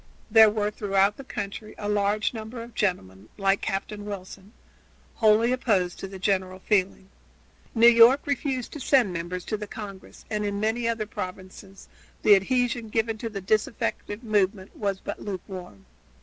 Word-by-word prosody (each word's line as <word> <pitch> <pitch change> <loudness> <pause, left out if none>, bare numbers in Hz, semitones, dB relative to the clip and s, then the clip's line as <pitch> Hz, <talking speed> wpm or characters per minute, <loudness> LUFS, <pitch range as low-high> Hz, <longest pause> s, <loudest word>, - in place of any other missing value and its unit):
There 220 -1 +8
were 210 0 -1
throughout 200 -1 +1
the 275 - -8
country 210 -2 -6
a 205 - -5
large 210 +1 +1
number 225 +1 -7
of 235 0 -12
gentlemen, 100 - -2
like 195 -1 +2
Captain 205 +2 -3
Wilson, 200 0 -8 0.6
wholly 225 +1 +4
opposed 205 -9 0
to - - -5
the 190 0 -9
general 190 -1 0
feeling. 190 0 0 0.7
New 230 0 +5
York 235 +4 +7
refused 270 -3 -2
to 300 - -6
send 255 -7 +3
members 175 +2 -4
to 215 - -2
the 210 0 -6
Congress, 200 -3 -10
and 210 -1 -1
in 200 -1 -2
many 225 +2 0
other 230 -2 -1
provinces 190 0 -8 0.4
the 210 - +7
adhesion 240 +3 +1
given 225 0 -1
to 230 - -4
the 200 -2 -6
disaffected 215 +2 -1
movement 200 -3 0
was 200 -2 -2
but - - -6
lukewarm. 185 - -7
210 Hz, 160 wpm, -26 LUFS, 195-225 Hz, 0.7 s, There